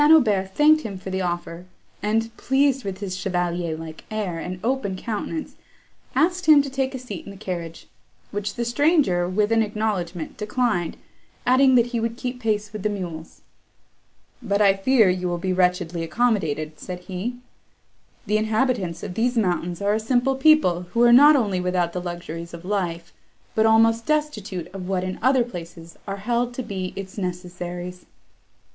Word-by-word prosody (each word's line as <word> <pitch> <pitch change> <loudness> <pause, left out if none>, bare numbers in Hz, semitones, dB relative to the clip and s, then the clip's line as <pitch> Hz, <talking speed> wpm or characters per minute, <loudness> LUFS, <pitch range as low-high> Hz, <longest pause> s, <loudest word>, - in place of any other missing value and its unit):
Aubert 205 -11 +4
thanked 310 +1 +5
him 200 -7 -6
for 190 +1 -7
the 190 0 -1
offer, 175 0 -4 0.3
and, 225 +2 0
pleased 270 0 +2
with 195 0 -5
his 190 -2 -3
chevalier 175 -3 -1
like 160 -1 -9
air 205 -6 -3
and 180 +2 -5
open 240 -5 -1
countenance, 230 - -4 0.6
asked 355 +6 +1
him 300 -2 +8
to 275 - -6
take 265 0 -1
a - - -2
seat 230 -8 -7
in - - -9
the 200 - -10
carriage; 170 -4 -6 0.5
which 205 0 -3
the 235 - -2
stranger, 240 - +2
with 210 +3 +1
an 225 0 +4
acknowledgment, 205 -6 -2
declined, 210 -5 -1 0.5
adding 260 +1 +5
that 240 -2 +5
he 235 - +1
would 230 +1 -2
keep 250 -1 -4
pace 210 -2 -1
with 215 - -5
the 210 - 0
mules. 170 -5 -6 1.0
"But 200 -4 0
I 200 -2 +5
fear 220 +2 +4
you 180 0 0
will 175 0 -1
be 185 +2 -1
wretchedly 180 -2 +1
accommodated," 160 -7 0
said 180 -1 -7
he: 190 +7 -4 0.9
"the 215 0 +2
inhabitants 220 -5 0
of - - -5
these 240 +5 0
mountains 180 -3 0
are 205 +1 +2
a 215 - +1
simple 245 +4 +1
people, 265 - +4
who 235 - +3
are 240 0 +7
not 290 +4 +8
only 205 -8 +1
without 180 -1 0
the 180 - -3
luxuries 175 -1 -6
of 170 +1 -11
life, 175 -4 -2 0.4
but 220 0 +3
almost 225 +1 +4
destitute 230 - -1
of 185 -2 -6
what 185 -1 0
in 185 0 -4
other 260 0 +4
places 170 -6 -9
are 195 0 -3
held 240 +4 -1
to 255 - -3
be 190 -4 -4
its 195 +1 -7
necessaries." 180 0 -5
200 Hz, 175 wpm, -23 LUFS, 180-240 Hz, 1.0 s, him